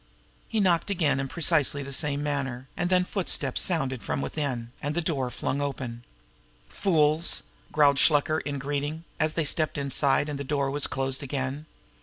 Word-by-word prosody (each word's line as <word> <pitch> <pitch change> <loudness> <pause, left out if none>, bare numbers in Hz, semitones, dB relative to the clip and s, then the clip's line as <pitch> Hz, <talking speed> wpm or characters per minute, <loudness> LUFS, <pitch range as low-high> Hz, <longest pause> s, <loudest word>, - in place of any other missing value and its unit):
He 225 - 0
knocked 180 -2 +2
again 155 -8 +1
in 135 - -2
precisely 150 -2 +2
the 140 0 -5
same 145 0 0
manner, 135 -3 -3
and 175 0 -1
then 180 -1 +4
a - - -7
footstep 170 -9 0
sounded 135 -8 0
from - - -2
within, 135 -5 -3
and 145 +2 -2
the - - +2
door 155 -6 -1
was 125 - -7
flung 140 - -2
open. 130 -4 -4 0.6
"Fools!" 160 -3 +3 0.3
growled 145 -2 +4
Shluker 155 +1 +4
in 145 -1 -4
greeting, 145 +3 -3 0.2
as 155 0 +1
they 165 - +1
stepped 155 +1 0
inside 140 0 +2
and 145 -2 -4
the - - -3
door 140 -1 -1
was 145 0 +2
closed 135 0 -1
again. 140 +2 -3
145 Hz, 180 wpm, -27 LUFS, 135-155 Hz, 0.6 s, then